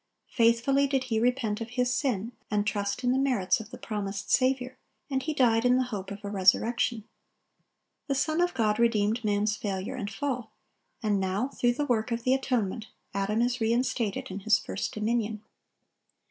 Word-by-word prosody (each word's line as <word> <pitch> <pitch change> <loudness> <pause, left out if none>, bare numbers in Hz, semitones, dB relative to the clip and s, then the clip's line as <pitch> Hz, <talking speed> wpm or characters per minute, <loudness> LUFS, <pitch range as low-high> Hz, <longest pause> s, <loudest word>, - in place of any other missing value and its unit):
Faithfully 240 +4 +3
did 270 -1 0
he 230 -4 -1
repent 235 -3 0
of 230 - -4
his 250 0 +2
sin, 240 -5 -1 0.2
and 205 -1 +1
trust 205 +3 -2
in 245 - +3
the 260 - +2
merits 240 -10 +2
of 220 -1 -9
the - - -9
promised 200 -2 -4
Saviour, 255 -1 +2 0.4
and 265 -1 +1
he 310 - -2
died 235 -6 +3
in 250 0 +4
the 255 - +2
hope 195 -2 -4
of 205 +1 -8
a - - -3
resurrection. 220 +4 +2 1.0
The 275 - 0
Son 310 +5 +1
of 355 -3 +1
God 215 -3 +1
redeemed 230 0 +2
man's 210 0 +1
failure 195 -2 -3
and 205 -5 -4
fall; 250 -6 -3 0.5
and 205 -2 +2
now, 195 +7 -1
through 240 -3 +1
the 290 +4 -1
work 230 -4 0
of 230 0 -2
the 255 - +3
atonement, 235 -5 -1 0.3
Adam 210 +3 +1
is 245 0 -1
re 225 0 +2
instated 235 -5 -1
in 190 - -4
his 210 +1 +4
first 200 - -4
dominion. 215 0 -1
230 Hz, 185 wpm, -28 LUFS, 210-255 Hz, 1.0 s, in